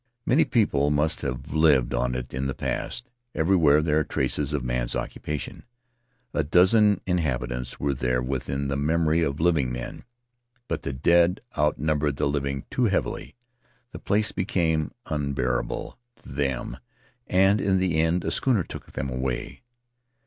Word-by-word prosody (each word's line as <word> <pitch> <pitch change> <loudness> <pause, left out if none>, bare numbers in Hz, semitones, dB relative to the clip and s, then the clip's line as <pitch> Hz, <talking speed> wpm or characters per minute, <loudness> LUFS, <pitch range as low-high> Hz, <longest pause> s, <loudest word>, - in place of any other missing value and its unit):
Many 140 +7 +4
people 75 - +2
must 75 +2 +1
have 65 +1 -4
lived 75 -6 +4
on 60 0 0
it 60 -1 -5
in 65 +1 -2
the 65 - -3
past; 120 0 -4 0.2
everywhere 80 -3 +4
there 75 -1 +2
are - - +1
traces 70 +1 -1
of 75 -4 -1
man's - - -2
occupation. 75 -1 -4 0.7
A - - +1
dozen 95 +5 +4
inhabitants 65 -8 -2
were 70 0 0
there 65 -1 0
within 70 +2 -2
the 70 - -1
memory 80 +3 +2
of 70 -3 -1
living 80 -7 +2
men, 60 0 -6 0.6
but - - -2
the - - -3
dead 85 +7 +3 0.2
out 75 +1 +2
numbered 75 -2 0
the - - 0
living 70 -1 -2
too 125 - +1
heavily 100 -4 -1 0.3
— 120 +1 -39
the - - -8
place 105 +1 +1
became 80 -4 0
unbearable 70 -5 -2 0.2
to - - -16
them, 65 -3 -2 0.5
and 95 +3 +4
in 95 -2 +2
the 90 -4 +1
end 80 +2 +1
a - - 0
schooner 120 -9 +1
took - - -10
them 70 - -3
away. 65 -1 -3
75 Hz, 155 wpm, -25 LUFS, 65-85 Hz, 0.7 s, Many